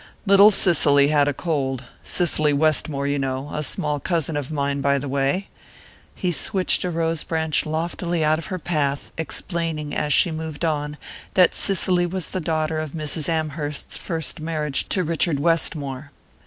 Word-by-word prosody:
Little 200 +1 +8
Cicely 145 -8 +4
had 145 -1 +3
a - - +2
cold 135 -4 -2 0.2
Cicely 155 -4 +1
Westmore, 145 -1 +1
you 140 0 0
know 135 +1 -3
a 150 - -2
small 150 0 -1
cousin 165 -1 -1
of 145 0 -3
mine, 140 -1 -1
by 140 0 +2
the 140 +1 -4
way 140 +8 0 0.4
" - - -23 0.3
he 180 - -1
switched 185 +3 +1
a 180 - -1
rose 165 -2 -1
branch 160 -2 0
loftily 170 +1 -1
out 155 +1 +2
of 165 - -7
her 185 - -3
path, 145 -5 -2
explaining, 160 -1 -3
as 150 - -1
she 170 - +4
moved 160 0 -4
on, 150 -2 -2 0.4
that 180 -2 +5
Cicely 180 -2 +1
was 185 0 -4
the 185 - -3
daughter 155 0 -1
of 155 -2 -5
Mrs. 155 0 -2
Amherst's 155 -2 -2
first 165 -4 -4
marriage 155 -3 -2
to 185 - +1
Richard 165 -2 0
Westmore. 145 -3 0
155 Hz, 170 wpm, -22 LUFS, 145-170 Hz, 0.4 s, Little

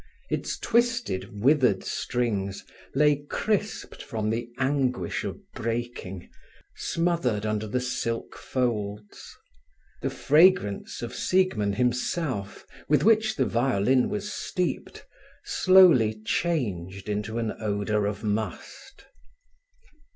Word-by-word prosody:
Its - - -2
twisted, 235 - 0
withered 130 -8 +4
strings 100 -5 -2 0.3
lay 150 0 +4
crisped 210 0 -2
from 110 -1 -2
the 120 +1 -3
anguish 130 -8 0
of - - -4 0.2
breaking, 115 -5 -4 0.5
smothered 165 -11 0
under 110 0 -1
the 115 +5 -1
silk 115 -2 -3
folds. 105 -5 -3 0.6
The - - -1
fragrance 155 - +3
of 120 - -5
Siegmund 120 - +1
himself, 125 - -1 0.2
with 150 - +4
which 220 0 +4
the 130 - +1
violin 125 +1 +2
was 210 0 -3
steeped, 180 -1 -3 0.4
slowly 165 - +5
changed 100 - -1
into 105 +2 -2
an 115 -2 -1
odour 105 -1 0
of 105 +1 -4
must. 105 +1 -4
120 Hz, 100 wpm, -26 LUFS, 105-150 Hz, 0.6 s, slowly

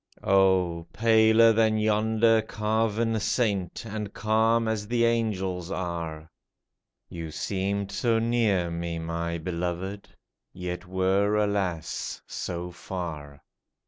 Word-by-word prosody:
O, 95 -3 +3
paler 110 0 +5
than 110 0 +3
yonder 110 +1 +3
carven 110 +1 0
saint, 105 -4 -1
And 105 -2 -5
calm 110 +2 +2
as 110 -2 -2
the 120 +1 +2
angels 95 -6 -1
are. 85 -4 -4 0.8
You 85 -2 -7
seemed 100 +4 -2
so 115 -2 +1
near 115 -7 +1
me, 85 0 -3
my 85 +1 -3
beloved, 90 +4 -4 0.4
Yet 90 0 -5
were, 95 +3 +1
alas, 100 -6 -1
so 90 0 -5
far 80 -6 -7
100 Hz, 105 wpm, -27 LUFS, 90-110 Hz, 0.8 s, paler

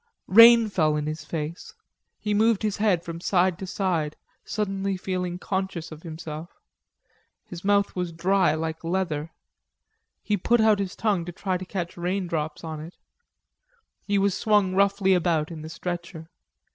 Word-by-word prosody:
Rain 230 +2 +8
fell 155 -7 +1
in 150 -1 -2
his 155 +1 -4
face. 155 +1 -6 0.4
He 210 - -2
moved 220 0 +3
his 210 -2 -1
head 205 -5 +2
from 170 0 -6
side 180 -1 +2
to 190 - -6
side, 175 -6 -1 0.3
suddenly 195 -2 -2
feeling 180 -1 -3
conscious 190 -3 -3
of 155 0 -10
himself. 160 0 -8 0.9
His 175 -1 -9
mouth 200 0 +2
was 180 -2 -2
dry, 180 +1 +2
like 160 +1 -4
leather; 165 -3 -2 0.9
he 210 -1 0
put 235 +6 +2
out 220 -2 +4
his 195 -2 -3
tongue 205 -6 0
to 175 - -5
try 185 +2 -2
to 185 +1 -4
catch 180 -2 -5
raindrops 175 -4 -2
in 160 -1 -5
it. 160 +3 -9 1.1
He 205 -1 0
was 200 -1 +2
swung 205 -3 +2
roughly 200 0 +3
about 170 -3 +1
in 160 -2 -7
the 155 - -8
stretcher. 170 -1 -6
180 Hz, 160 wpm, -25 LUFS, 165-200 Hz, 1.1 s, Rain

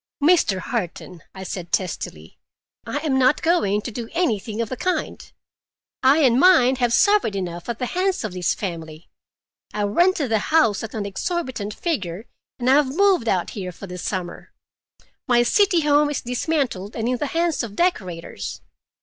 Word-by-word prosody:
'" - - -71
"Mr. 315 - +4
Harton," 185 -5 -5
I 190 - -7
said 180 -2 -6
testily, 80 - -3 0.5
"I - - -2
am 265 -3 +2
not 260 +3 +3
going 210 - +2
to 245 - -5
do 230 0 -6
anything 225 - -1
of 230 -2 -1
the - - -3
kind. 365 +7 -3 0.7
I 275 +4 +5
and 250 -2 +4
mine 270 -7 +5
have 245 -2 +1
suffered 405 - +3
enough 175 0 -5
at 235 - -2
the 250 - -2
hands 370 +4 -1
of 215 -4 -4
this 180 -2 0
family. 165 -4 -7 0.6
I 210 - 0
rented 300 - +2
the 220 - +3
house 310 -11 +3
at 225 0 -7
an 210 -2 -3
exorbitant 225 - -3
figure 205 - -3 0.3
and 245 - -3
I 265 +2 +6
have 280 -2 +1
moved 385 -9 +3
out 185 -5 0
here 185 -4 -5
for 190 - -10
the 180 -1 -8
summer. 180 -1 -5 0.7
My 240 -1 +4
city 375 - +3
home 295 0 +3
is 290 - -2
dismantled 245 - -2
and 225 0 -2
in 250 0 0
the 295 - -2
hands 335 +1 0
of 220 -4 -6
decorators. 180 - -2
235 Hz, 175 wpm, -22 LUFS, 195-300 Hz, 0.7 s, I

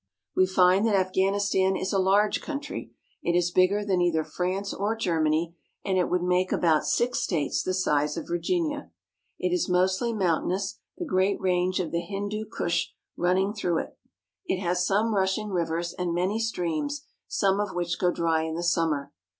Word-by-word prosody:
We 185 - +4
find 185 +1 +4
that 215 - +2
Afghanistan 190 0 +2
is 190 +1 -2
a 195 - +2
large 200 +3 +3
country. 295 0 -5 0.3
It 170 0 +1
is 175 0 +1
bigger 190 +3 +3
than 190 -3 +1
either 165 -3 +2
France 185 +4 -3
or 205 +3 -1
Germany, 165 -4 0 0.3
and 195 -2 +1
it 180 - +1
would 180 0 +1
make 180 +1 +1
about 160 -3 +2
six 245 +1 +1
states 150 -6 0
the 185 - -1
size 150 -4 +1
of 165 - -5
Virginia. 295 - -1 0.5
It 360 - -1
is 355 - 0
mostly 185 +6 +2
mountainous, 190 -1 -1 0.2
the 350 - -4
great 195 - +1
range 185 0 +1
of 180 - -2
the 170 - 0
Hindu 205 +4 -4
Kush 170 0 0 0.3
running 190 +3 +1
through 180 -6 0
it. - - -5 0.5
It 190 - 0
has 180 -1 0
some 215 +3 +2
rushing 195 +2 0
rivers 170 -2 -1
and 175 -2 -2
many 190 +5 0
streams, 225 - -2 0.2
some 195 -1 +1
of 205 -3 -2
which 175 -1 -2
go 180 - +3
dry 165 -2 +1
in 160 0 -3
the 170 - -3
summer. 165 -5 0
185 Hz, 175 wpm, -27 LUFS, 175-200 Hz, 0.5 s, We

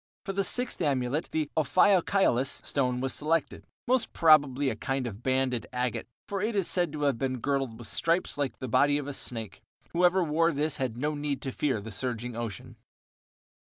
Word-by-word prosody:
For 195 - -3
the 195 +1 +1
sixth 245 +6 -1
amulet 135 +1 0
the 155 -2 -1
ophiokiolus 165 -3 +3
stone 125 -3 0
was 135 0 -1
selected, 155 +1 0 0.2
most 255 0 +1
probably 145 -4 +4
a - - -4
kind 135 +3 -2
of 110 -2 -6
banded 130 -2 0
agate, 125 -2 -2 0.2
for 195 -1 -3
it 215 +1 -1
is 195 -4 +1
said 175 -4 +2
to 150 -1 -3
have 140 -5 +1
been 130 -1 -1
girdled 135 -3 -1
with 120 -2 -10
stripes 165 - +1
like 145 -2 -2
the 130 - -5
body 145 +5 +3
of 145 - -4
a 145 - -4
snake; 115 -5 -5 0.3
whoever 180 +2 +3
wore 165 +1 +2
this 150 +1 -1
had 125 -3 -2
no 150 +4 -1
need 145 -2 -2
to 135 - -3
fear 130 -4 0
the 110 +2 -8
surging 120 +1 -4
ocean. 115 -5 -6
140 Hz, 190 wpm, -28 LUFS, 125-165 Hz, 0.3 s, probably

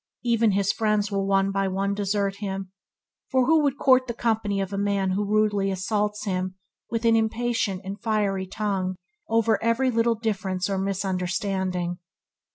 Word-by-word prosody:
Even 230 -3 +3
his 200 0 +2
friends 210 -2 +1
will 195 -1 0
one 195 0 +2
by 195 0 0
one 195 +1 -1
desert 200 -1 -1
him, 195 -2 -4 0.6
for 260 -2 +3
who 320 +3 +4
would 285 -2 +1
court 255 -1 +4
the 235 - -4
company 220 -4 0
of 195 0 -3
a - - -1
man 200 -2 +1
who 200 +3 0
rudely 205 -1 +1
assaults 210 +2 -1
him 185 -1 -2 0.3
with 230 0 -2
an 230 0 +5
impatient 225 -3 0
and 195 +2 -6
fiery 205 -4 0
tongue 190 -2 -2 0.3
over 225 -1 +2
every 230 +3 +2
little 230 0 +2
difference 195 -4 -2
or 195 - 0
misunderstanding. 185 -2 -1
200 Hz, 165 wpm, -25 LUFS, 195-225 Hz, 0.6 s, an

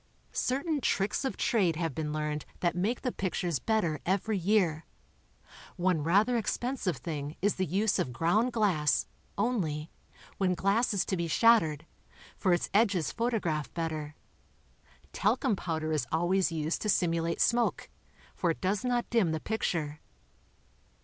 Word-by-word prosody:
Certain 280 +3 -1
tricks 200 +2 0
of 265 - -2
trade 190 -8 +2
have 165 -2 -2
been 155 0 -3
learned 150 -1 -2 0.2
that 175 -2 +1
make 205 +7 -1
the 250 - 0
pictures 180 - -2
better 170 - 0
every 200 +4 0
year. 180 -5 +1 0.9
One 180 -3 +1
rather 200 +10 +3
expensive 235 -3 -2
thing 150 -2 -5
is 205 +2 +1
the 185 -1 0
use 200 +5 +1
of 125 - -1
ground 190 - +2
glass, 175 - +2 0.3
only, 175 -9 -1 0.5
when 185 -2 +2
glass 200 +7 +2
is 195 - +1
to 190 - -1
be 170 -1 -2
shattered, 165 -6 +4 0.5
for 185 - +1
its 175 - +2
edges 200 -6 +2
photograph 200 -11 -1
better. 155 -3 -3 1.0
Tal 210 +6 +2
cum 215 - +1
powder 160 -4 -3
is 150 -6 0
always 175 +2 +2
used 160 0 -2
to 210 - -1
simulate 170 -3 +1
smoke, 240 0 +2 0.5
for 175 - 0
it 165 - -1
does 195 +3 0
not 245 -1 0
dim 220 -8 +3
the 160 - -1
picture. 155 -7 -2
180 Hz, 150 wpm, -30 LUFS, 160-215 Hz, 1.0 s, shattered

